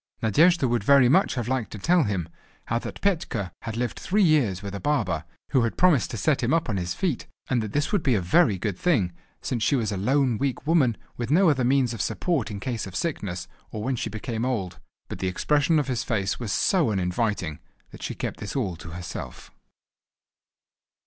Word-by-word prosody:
Nadejda 155 - +4
would 120 -3 0
very 135 +1 +6
much 180 +7 +3
have 120 -3 -2
liked 130 -3 -1
to - - -6
tell 170 - +3
him, 95 -6 -2 0.4
how 115 - 0
that - - -8
Petka 155 - -1
had 115 -1 -5
lived 120 0 -2
three 205 +2 +2
years 125 - +2
with 100 -1 -5
a 100 - -4
barber, 145 +3 0 0.3
who 130 - +4
had 115 -1 -1
promised 175 -8 +4
to 120 - -5
set 150 +4 +1
him 125 +4 +1
upon 125 -11 +1
his 90 -1 -2
feet; 170 -10 -2 0.2
and 125 -3 +2
that 110 -2 -4
this 145 0 0
would 205 - +2
be 130 -4 +2
a - - +2
very 100 - +3
good 100 0 -3
thing, 125 - +2 0.3
since 120 -3 -2
she 140 - +3
was 110 -5 0
a 100 - -2
lone 125 +3 +1
weak 135 -1 -2
woman, 145 -8 +3 0.2
with 120 -1 -3
no 170 +3 +5
other 130 -3 0
means 130 -1 +2
of 115 - -4
support 130 - -1
in 100 -2 -5
case 115 0 -3
of 95 - -10
sickness 100 - -3 0.2
or 105 - -5
when 130 +3 0
she 115 - -3
became 110 +2 -4
old. 110 -9 -2 0.3
But - - -7
the 95 - -1
expression 150 - +2
of 150 - +2
his 125 -3 -1
face 100 -5 -1
was 115 -4 -3
so 175 - +2
uninviting, 95 -3 -1 0.3
that - - -12
she - - -4
kept - - -4 0.2
all 120 -9 0
this 85 - -12
to - - -8
herself. 85 +1 -7
120 Hz, 215 wpm, -25 LUFS, 100-145 Hz, 0.4 s, very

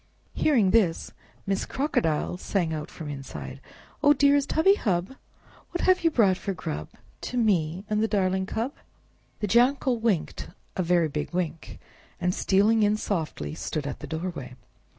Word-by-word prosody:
Hearing 230 -11 +3
this, 190 -8 +2 0.3
Miss 195 -1 0
Crocodile 175 - 0
sang 180 -3 -1
out 155 -1 -5
from 160 - -8
inside, 135 -2 -7 0.4
"Oh, 290 -1 +6
dearest 285 -1 +3
hubby 325 +5 +5
hub! 190 - -1 0.6
What 350 - -3
have 370 -1 +3
you 330 - +5
brought 205 - +3
for 195 - -3
grub 75 - -5 0.4
To 250 - -4
me 185 -5 +1
and 215 -1 0
the 220 - +2
darling 190 -2 0
cub?" 235 +8 -2 0.7
The 210 - 0
Jackal 245 +3 +3
winked 220 -8 -1 0.3
a - - 0
very 175 -2 +3
big 150 +3 -4
wink, 170 -3 -3 0.4
and, 180 0 +1
stealing 210 +5 +3
in 210 0 +3
softly, 160 - -3
stood 90 - -4
at 140 - -5
the - - -8
doorway. 160 -6 -5
190 Hz, 155 wpm, -26 LUFS, 160-230 Hz, 0.7 s, Oh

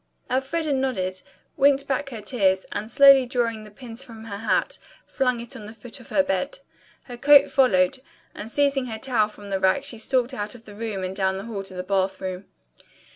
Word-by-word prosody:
Elfreda 280 +4 0
nodded, 190 -9 -1 0.4
winked 275 0 +4
back 275 +1 -1
her 230 -5 -7
tears, 195 -4 +1
and 215 +2 -4
slowly 275 -1 +7
drawing 230 -3 -1
the - - -12
pins 235 +3 -7
from 225 -4 -11
her 205 -3 -6
hat, 225 - 0 0.3
flung 250 -3 0
it 235 +3 -7
on 220 -5 -9
the 215 +2 -10
foot 245 +4 -9
of 245 - -15
her 285 - +3
bed. 285 +12 -2 0.5
Her 245 -2 -9
coat 285 +2 +6
followed, 205 -4 +3 0.3
and 215 - -8
seizing 275 0 +1
her 220 -2 -5
towel 220 -3 +1
from 205 -1 -12
the 195 - 0
rack 190 +9 +2
she 235 -5 -3
stalked 255 +2 0
out 210 -1 -4
of 230 - -15
the 210 - -11
room 210 -3 -4
and 185 +1 -4
down 190 -1 0
the 195 - -6
hall 220 -4 -5
to 195 -1 -10
the 180 - -4
bath 190 0 0
room. 185 0 -5
230 Hz, 210 wpm, -24 LUFS, 200-265 Hz, 0.5 s, slowly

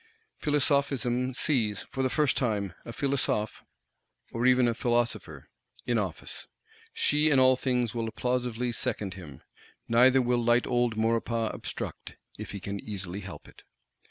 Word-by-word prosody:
Philosophism 135 -4 +1
sees, 110 -10 0
for 135 - -2
the 130 - +2
first 150 0 +2
time, 105 -7 -1
a - - -6
Philosophe 125 -4 -1 0.7
(or 120 +2 +1
even 125 -1 +5
a 120 - +2
Philosopher) 120 0 -1 0.4
in - - +1
office: - - -5 0.4
she 150 +1 +2
in 140 - +4
all 130 0 +6
things 125 -3 0
will 115 -1 -2
applausively 125 -1 -1
second 105 -6 -2
him; 80 -9 -11 0.4
neither 125 +3 +5
will 120 -1 +1
light 120 +1 +3
old 120 -2 +1
Maurepas 115 0 0
obstruct, - - -6 0.2
if - - -8
he 100 - -6
can 100 +2 -5
easily 95 -3 -5
help 95 -2 -9
it. - - -17
120 Hz, 145 wpm, -28 LUFS, 110-130 Hz, 0.7 s, all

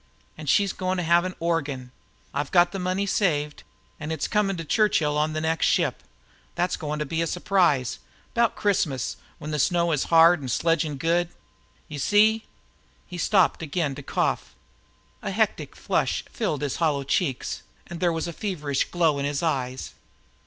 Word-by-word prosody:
An' 155 -1 -9
she's 195 +8 +3
goin' 185 0 -2
to 180 - -1
have 170 +2 +4
an 185 - -4
organ. 145 -7 -2 0.4
I've 145 +1 -2
got 175 -1 +4
the 195 - -4
money 185 +2 -1
saved, 150 -7 0 0.4
an' 150 - -5
it's 160 - -2
coming 200 -3 +1
to 165 - -5
Churchill 160 -6 +2
on 155 +1 +1
the 155 - -2
next 160 0 +1
ship. - - +1 0.5
That's 175 +1 0
goin' 150 -1 -4
to 150 - -2
be 160 +3 -2
a 165 - 0
surprise 170 -9 +1 0.3
'bout 235 -1 +2
Christmas, 165 - 0 0.2
when 150 - -6
the 150 - -1
snow 170 +3 +2
is 150 -4 +1
hard 165 0 +6
an' 130 - -5
sledging 160 +1 +1
good. 170 +3 +1 0.6
You 150 - -7
see 215 +7 +3 0.3
" - - -36
He 175 - -5
stopped 190 -2 +3
again 155 -2 -1
to 145 - -8
cough. - - -1 0.7
A - - -3
hectic - - -1
flush - - 0
filled 150 -1 -2
his 140 - -2
hollow 150 -4 +1
cheeks, 135 -1 -1 0.2
and 170 -1 -8
there 175 -1 +2
was 165 0 -2
a 170 - -5
feverish 150 -8 -2
glow 165 -5 +1
in 140 - -1
his 145 +2 -2
eyes. 130 -5 -2
165 Hz, 180 wpm, -25 LUFS, 145-180 Hz, 0.7 s, hard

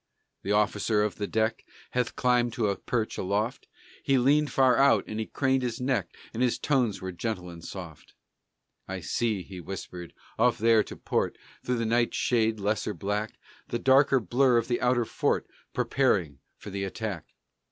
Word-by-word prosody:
The 100 - -3
officer 105 0 +2
of 105 - -2
the 105 - -2
deck 110 0 0 0.3
Had 125 -1 -1
climbed 125 -2 +2
to 110 -3 0
a 100 - 0
perch 115 0 -2
aloft, 105 +7 -1
And - - -25
he 135 -1 +3
leaned 145 +4 +3
far 130 -2 +4
out 140 +1 +4
and 110 - -5
he 110 - -3
craned 135 -1 +1
his 120 -2 -3
neck, 125 -8 0 0.3
And 115 - -3
his 125 -2 +2
tones 125 -10 0
were 95 - -3
gentle 90 -1 -4
and 85 -1 -11
soft: 85 -6 -9 0.7
"I 95 -1 -5
see," 110 +1 -1
he 95 -1 -9
whispered, 90 -1 -8 0.2
"off 120 +1 +4
there 115 0 +5
to - - -8
port, - - -1 0.3
Through 125 0 0
the 115 - -1
night 120 +1 +1
shade's 110 -3 +1
lesser 105 +1 -1
black, 105 +2 -2 0.3
The 120 - -2
darker 135 +2 +4
blur 125 +3 +3
of 115 - 0
the 120 - -1
outer 125 -1 +2
fort, - - 0 0.3
Preparing 90 - +1 0.2
for 100 - -9
the 100 0 -3
attack." 95 -3 -4
110 Hz, 180 wpm, -28 LUFS, 100-125 Hz, 0.7 s, there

